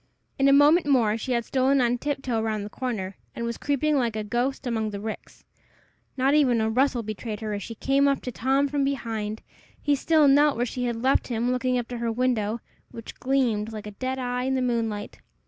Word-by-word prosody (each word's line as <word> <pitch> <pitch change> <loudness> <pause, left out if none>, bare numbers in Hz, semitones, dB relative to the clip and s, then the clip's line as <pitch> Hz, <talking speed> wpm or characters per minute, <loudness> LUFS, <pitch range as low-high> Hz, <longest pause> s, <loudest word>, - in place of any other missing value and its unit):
In 270 - +4
a - - +6
moment 290 +4 +5
more 235 -7 +3
she 240 +3 -3
had 235 -1 0
stolen 270 +1 +2
on 245 -1 +1
tiptoe 270 -5 -2
round 215 -2 -2
the 210 - -9
corner, 210 -7 -4 0.2
and 235 - -3
was 235 0 -4
creeping 290 +1 +1
like 235 -4 0
a 215 - -2
ghost 245 +6 -2
among 225 -3 -1
the 200 -1 -5
ricks. 215 +1 -8 0.7
Not 265 +2 +3
even 265 -6 +4
a 220 0 +1
rustle 255 0 +1
betrayed 215 0 -5
her 215 -1 -3
as 205 - -3
she 230 +3 -7
came 275 +4 +2
up 275 -1 +2
to 250 - -4
Tom 270 +4 +1
from 285 0 -1
behind. 225 -6 -3 0.4
He 290 - +1
still 305 +1 +3
knelt 285 0 +4
where 240 - +1
she 250 +1 -3
had 235 -1 -3
left 265 +1 +2
him, 240 0 -1
looking 255 0 0
up 240 -1 -2
to 245 -1 -5
her 235 -1 -1
window, 230 -2 0 0.3
which 230 - -10
gleamed 240 -5 0
like 215 -1 -7
a 210 - -6
dead 255 +6 -3
eye 250 0 -2
in 265 0 0
the 260 - 0
moonlight. 225 -4 -2
245 Hz, 220 wpm, -25 LUFS, 220-270 Hz, 0.7 s, a